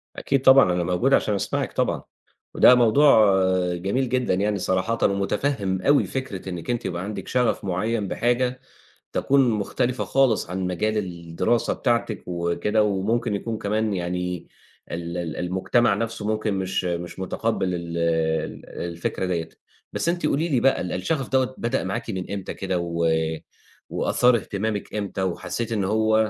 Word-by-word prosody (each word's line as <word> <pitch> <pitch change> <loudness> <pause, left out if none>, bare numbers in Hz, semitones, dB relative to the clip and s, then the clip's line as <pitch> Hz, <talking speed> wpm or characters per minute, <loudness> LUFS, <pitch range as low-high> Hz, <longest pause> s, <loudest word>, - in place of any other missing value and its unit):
أكيد 135 - 0
طبعًا، 130 -8 +6
أنا 90 0 0
موجود 90 +10 +1
عشان 105 - +3
أسمعِك 100 - -2
طبعًا، - - 0 0.5
وده 125 - +7
موضوع 115 -4 +5 0.4
جميل 100 +9 -1
جدًا 125 -5 +1
يعني 100 +2 0
صراحةً 95 +5 0
ومُتفهِّم 100 0 0
أوي 145 +9 +4
فكرة 125 -9 -5
إنِّك 90 +1 -6
أنتِ 120 -1 -1
يبقى 85 0 -3
عندِك 105 +1 -6
شَغَف 125 -4 0
معيّن 100 +3 -1
بحاجة 125 +4 0 0.5
تكون 135 -2 +3
مختلفة 120 +4 -1
خالص 130 -9 +2
عن 95 0 -2
مجال 105 +5 0
الدراسة 85 +4 -1
بتاعتِك 115 -5 -1
وكده 85 +5 0
وممكن 105 +2 0
يكون 110 +2 -3
كمان 105 +1 -1
يعني 90 -1 -3 0.4
ال 85 0 -4
ال 85 -2 -4
المجتمع 95 +5 +1
نَفْسه 115 0 -3
ممكن 110 -1 0
مش 95 -1 -1
مش 85 0 -4
مُتقبِّل 95 -1 -1
ال 85 -1 -5
ال 80 -1 -1
الفكرة 85 +2 -4
دِيّة، 85 -3 -2 0.4
بس - - -1
أنتِ 175 -2 0
قولي 155 +3 +1
لي 135 -6 +2
بقى 135 +2 +3
ال 90 - -3
الشغف 135 - -1
دوّة 130 -1 +1
بدأ 120 0 -1
معاكِ 95 +4 -3
من 95 -3 -4
إمتى 100 -2 -4
كده 95 -2 -2
و 85 -1 -1 0.8
وأثار 125 -1 +3
اهتمامِك 105 0 -3
إمتى 100 -2 -3
وحسّيتِ 95 +5 -3
إن 105 -3 0
هو 110 +2 +2
100 Hz, 155 wpm, -24 LUFS, 90-120 Hz, 0.8 s, وده